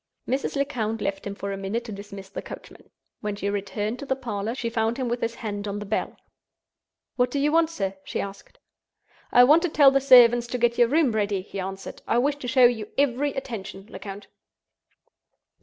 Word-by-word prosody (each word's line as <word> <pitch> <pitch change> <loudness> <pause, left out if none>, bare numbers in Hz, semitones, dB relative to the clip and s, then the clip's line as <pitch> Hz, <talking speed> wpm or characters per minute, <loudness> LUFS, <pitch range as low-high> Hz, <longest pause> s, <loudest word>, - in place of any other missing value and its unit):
Mrs. 265 +3 -1
Lecount 235 -6 -1
left 195 -1 -3
him 200 - -5
for 200 0 -5
a 195 - -4
minute 200 +5 -3
to 225 - -7
dismiss 200 -1 -9
the 195 - -6
coachman. - - -11 0.3
When 210 -1 -3
she 200 0 -2
returned 205 +3 -3
to - - -6
the 265 - +1
parlor 225 -3 -4
she 245 - -3
found 225 +1 0
him 260 -2 -2
with 240 +1 -2
his 230 0 -2
hand 205 -2 -5
on 200 0 -3
the 205 - -5
bell. 215 +2 -2 1.0
"What 250 -1 +3
do 285 - -3
you 290 +2 +2
want, 325 0 +3
sir?" 195 -12 -3
she - - -4
asked. 200 0 -7 0.7
"I 245 - +7
want 300 +6 +6
to 355 - 0
tell 285 -3 +6
the 275 0 +2
servants 240 -2 +7
to 250 - -3
get 240 0 +1
your 240 - +6
room 295 0 +3
ready," 205 -3 -1
he 195 - -7
answered. 190 +1 -6
"I - - +2
wish 285 +4 +1
to 265 - -7
show 255 0 +5
you 225 -3 +2
every 280 +1 +1
attention, 200 -7 -6
Lecount." 195 +1 -8
230 Hz, 205 wpm, -25 LUFS, 200-260 Hz, 1.0 s, I